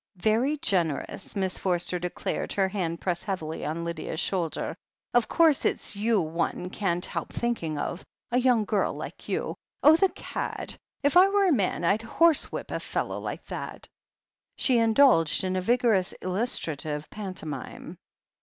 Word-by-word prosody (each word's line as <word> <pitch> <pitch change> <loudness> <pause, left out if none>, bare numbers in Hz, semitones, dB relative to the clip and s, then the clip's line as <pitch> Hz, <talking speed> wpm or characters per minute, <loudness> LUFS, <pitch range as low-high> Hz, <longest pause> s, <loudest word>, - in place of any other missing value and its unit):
"Very 225 +10 +2
generous 175 - -1
1" - - -1
Miss 190 -1 0
Forster 180 -1 0
declared, 180 0 -3
her 195 -1 +2
hand 180 -4 -2
pressed 175 -2 -2
heavily 160 -6 -3
on 160 +3 -3
Lydia's 165 -1 -4
shoulder. 180 -4 -1 0.4
"Of 240 -2 +3
course, 325 -4 +4
it's - - -1
you 215 +1 +2
one 170 +2 -2
can't 180 -4 0
help - - -4
thinking 200 -11 -2
of 175 - -3 0.2
— - - -50
a 245 - +3
young 245 -4 +3
girl 205 -1 0
like - - -8
you. - - -1 0.3
Oh, 305 +2 +8
the 385 +3 +3
cadi - - -5 0.3
If 285 +3 +2
I 375 +2 +8
were 400 0 +3
a 370 - +4
man, 195 -7 0
I'd 200 +6 +2
horsewhip 320 +7 +2
a - - -2
fellow - - -3
like - - -6
that" - - -6 0.7
She 250 -3 +3
indulged 225 - +4
in 185 0 -1
a 185 - 0
vigorous 225 -3 +2
illustrative 155 - -2
pantomime. 185 -10 -6
195 Hz, 160 wpm, -27 LUFS, 170-240 Hz, 0.7 s, Oh